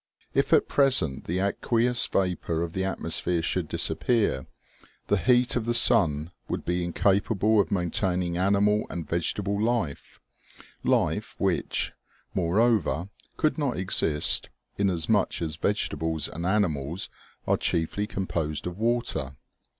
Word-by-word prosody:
If - - +1
at - - +4
present 130 - +2
the 85 - -2
aqueous 120 +5 +1
vapor 90 -3 -1
of 85 -1 -5
the 95 - -2
atmosphere 90 -2 -1
should - - -1
disappear, 110 - +1 0.6
the 105 - +3
heat 120 +7 +3
of 120 -3 -1
the 120 0 0
sun 85 - +4 0.2
would - - -3
be 90 0 -1
incapable 100 +4 +2
of 100 - +2
maintaining 90 -1 0
animal 100 +3 +2
and 85 -4 -6
vegetable 100 +5 -1
life; 110 -10 -2 0.6
life - - 0
which, - - 0 0.4
more 90 +2 0
over, 105 - +1 0.3
could 155 +1 0
not 140 -4 -1
exist, 85 -5 +1 0.3
inasmuch 95 +1 +1
as 80 -2 -3
vegetables 80 -5 -1
and 85 +3 -5
animals 85 -5 -1 0.3
are - - +2
chiefly 85 +5 -1
composed 80 -7 -3
of 90 +2 -6
water. 115 - -1
95 Hz, 125 wpm, -26 LUFS, 85-110 Hz, 0.6 s, at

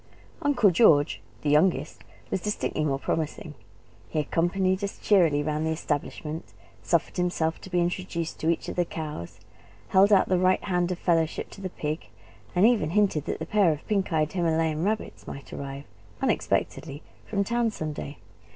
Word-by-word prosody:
Uncle 245 -9 +4
George 160 -7 +4 0.2
the 150 - +1
youngest 150 -1 +2 0.3
was 190 - 0
distinctly 210 -6 -1
more 140 -3 +1
promising. 155 +2 -3 0.6
He - - -4
accompanied 185 +5 +1
us 200 - -3
cheerily 165 -8 +3
round 155 +1 -1
the 160 - 0
establishment, 155 0 -3 0.3
suffered 170 +1 0
himself 170 -2 0
to - - -10
be 180 -1 +1
introduced 175 -1 -2
to 160 - 0
each 170 - 0
of - - -4
the 175 - +4
cows, 150 - -6 0.5
held 195 +2 +5
out 200 - +5
the 185 -1 +2
right 185 +1 +3
hand 180 -2 0
of 180 - -2
fellowship 165 -3 0
to 195 - -11
the 190 - -3
pig, 155 -2 -4 0.5
and 180 +3 +5
even 225 -10 +3
hinted 190 -5 +2
that - - -3
a - - -4
pair 205 -5 +3
of 150 -1 -5
pink 200 -3 0
eyed 155 -1 +1
Himalayan 165 -3 +1
rabbits 215 +3 -2
might 140 - -8
arrive 140 0 -6 0.4
unexpectedly 140 +2 -1 0.2
from 200 -2 0
town 235 +2 +1
some 155 -8 -4
day. 145 0 -7
170 Hz, 170 wpm, -27 LUFS, 155-190 Hz, 0.6 s, held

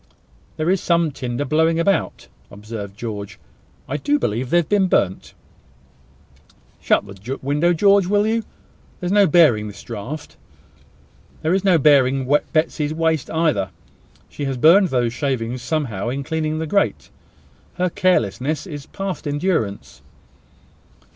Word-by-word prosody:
"There 155 +3 +1
is 190 - +1
some 170 -2 +1
tinder 125 0 -4
blowing 160 +3 +2
about," 195 +4 0 0.2
observed 105 -1 -8
George. 105 -3 -6 0.5
"I 140 - -2
do 145 +1 +1
believe 120 0 -2
they 175 - +3
have 170 - +1
been 200 -2 +2
burnt." 95 - -1 1.5
"Shut - - +2
the 100 +7 -7
window, 150 +5 +2
George, 200 +2 +4
will 205 +1 +2
you? 225 +1 +1 0.6
There - - -6
is 175 - -1
no 205 -1 +5
bearing 140 -10 +4
this 105 - -10
draught. 120 +7 -7 1.1
There 160 +3 +1
is 190 0 +1
no 185 -4 +4
bearing 135 -3 +3 0.2
Betsy's 155 -1 0
waste 160 -3 0
either. 155 - 0 0.6
She 145 - -6
has 135 -2 -2
burned 175 +9 +6
those 120 -5 0
shavings 125 -3 -2
somehow 120 -7 -2
in 135 +3 -3
cleaning 155 +1 -2
the 160 - -2
grate. 200 +6 0 0.7
Her 180 -1 0
carelessness 150 - 0
is 145 -5 -8
past 195 -5 -5
endurance." 145 - -2
150 Hz, 140 wpm, -21 LUFS, 120-170 Hz, 1.5 s, burned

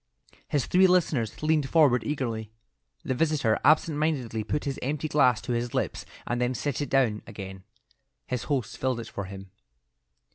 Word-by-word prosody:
His 145 -3 0
three 190 +1 +5
listeners 155 - +1
leaned 155 -3 +2
forward 140 -8 +4
eagerly. 115 -7 -3 0.5
The 130 - -1
visitor 140 -5 +1
absent 155 +1 +4
mindedly 130 -8 -1
put 110 +8 -2
his 140 -2 -3
empty 150 +3 -2
glass 130 -6 +3
to - - -5
his 120 0 -2
lips - - -2 0.2
and 120 0 -1
then 125 +1 0
set 145 +1 -2
it 145 - -3
down 120 -6 +2
again. 95 -1 -8 0.6
His 125 -2 -3
host 135 -8 -2
filled 130 -2 0
it 115 - -7
for 100 - -5
him. 95 0 -10
130 Hz, 170 wpm, -27 LUFS, 115-150 Hz, 0.6 s, three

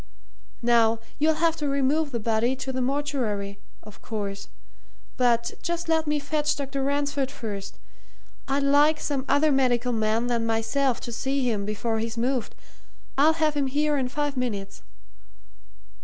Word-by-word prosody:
Now, 230 -1 +4 0.2
you'll 310 +1 +3
have 330 +1 +2
to 295 -2 -1
remove 280 +3 +1
the 235 - -2
body 225 +3 +1
to 265 0 -5
the 260 - -1
mortuary, 245 -8 -2 0.2
of 210 -1 -14
course 200 -3 -5 0.7
but 235 -2 +2
just 340 0 -2
let 320 -1 +2
me 300 0 +2
fetch 295 +1 0
Dr. 275 -1 -3
Ransford 285 -1 0
first. 200 -5 -6 0.7
I'd 275 +1 +1
like 290 +3 +4
some 275 -3 -2
other 290 +2 +4
medical 250 -2 +2
man 220 +1 +1
than 240 -2 0
myself 225 +3 +1
to 235 - -6
see 265 +2 -1
him 210 -4 0
before 220 +2 -1
he's 225 +1 -4
moved 250 +1 -1 0.6
I'll 300 +4 +5
have 310 -2 +1
him 285 -2 0
here 295 +2 +1
in 260 -3 0
five 290 +1 -2
minutes." 205 -6 -3
265 Hz, 155 wpm, -26 LUFS, 230-290 Hz, 0.7 s, I'll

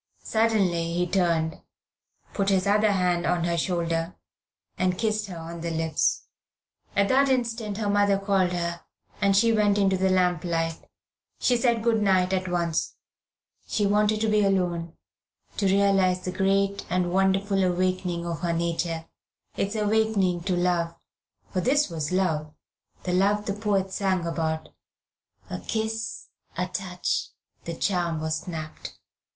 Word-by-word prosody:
Suddenly 195 -7 +1
he 175 +1 +1
turned, 170 -3 0 0.7
put 200 -1 0
his 190 -1 +2
other 210 +1 +3
hand 180 -3 +1
on 175 -1 +1
her 170 0 0
shoulder, 170 0 -1 0.6
and 185 -1 0
kissed 215 0 0
her 180 -3 -7
on 165 +1 -7
the 170 - -2
lips. 160 -1 0 0.7
At 200 0 +3
that 275 +1 +4
instant 230 -5 -1
her 215 -2 -2
mother 205 -1 +3
called 195 -2 +1
her, 170 -1 -3 0.4
and 200 -1 +4
she 230 +2 +4
went 210 -2 +3
into 195 -2 +3
the 190 +1 +2
lamp 180 -3 +2
light. 165 -2 -2 0.5
She 250 - +3
said 235 -2 +1
good 225 -2 +2
night 190 -2 +3
at 185 0 0
once. 170 -2 -1 0.7
She 210 - 0
wanted 210 +1 +2
to 220 - +2
be 215 -1 +3
alone, 175 -4 0 0.6
to 200 - +1
realise 195 -1 +3
the 180 - -2
great 195 +1 +1
and 180 0 0
wonderful 195 +1 +2
awakening 180 -1 0
of 170 -1 -3
her 170 -1 -1
nature, 165 -1 -2 0.5
its 200 +3 -2
awakening 210 -4 +1
to 185 - +1
love 175 -1 0 0.6
for 185 - 0
this 275 -1 +2
was 155 -2 -3
love, 160 -5 0 0.5
the 180 - -2
love 205 +3 +2
the 200 - -1
poets 200 -2 -1
sang 190 -3 0
about 160 -1 -2 0.8
"A 90 - -3
kiss, 220 - -3 0.3
a 180 - 0
touch, 180 -1 -2 0.4
the 170 - -4
charm, 175 -3 0
was 155 0 -1
snapped." 155 -2 -7
185 Hz, 150 wpm, -26 LUFS, 170-205 Hz, 0.8 s, that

